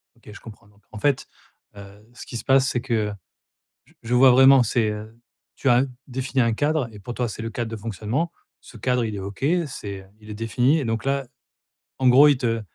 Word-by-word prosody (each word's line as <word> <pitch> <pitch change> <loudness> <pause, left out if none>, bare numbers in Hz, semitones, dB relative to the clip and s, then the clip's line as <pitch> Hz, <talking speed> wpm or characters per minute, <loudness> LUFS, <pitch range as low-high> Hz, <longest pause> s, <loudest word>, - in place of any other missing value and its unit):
OK, 115 -2 -15
je - - -12
comprends. 110 -1 -14
Donc 105 0 -26
en 110 - -8
fait, 140 0 0 0.5
heu, 100 +1 -13
ce - - -11
qui 120 - -7
se - - -7
passe, 135 0 +4
c'est 125 -3 -1
que, 110 -5 -1 0.8
j - - -26
je 120 +2 -2
vois 130 +1 +7
vraiment, 130 +1 +7
c'est, 110 -1 0
heu, 110 +2 -8 0.4
tu 135 - -1
as 120 +1 +5 0.3
défini 130 +1 -2
un 115 -1 +1
cadre 145 +1 0
et 105 - -11
pour 110 +5 -8
toi 120 -1 -2
c'est 110 - -7
le 115 - -4
cadre 115 +1 -4
de 115 - -5
fonctionnement. 115 - -3 0.3
Ce - - -15
cadre, 125 +2 0
il 110 -2 -4
est - - -5
OK, 100 +6 -7 0.2
c'est, 100 -8 -7
heu, - - -19
il 105 0 -13
est 105 - -5
défini 120 +7 +1
et 135 - -3
donc 115 0 -2
là, 135 0 -1 0.7
en 130 - +2
gros, 135 +4 +7
il 145 -3 +4
te 115 -3 -1
120 Hz, 230 wpm, -23 LUFS, 110-130 Hz, 0.8 s, vois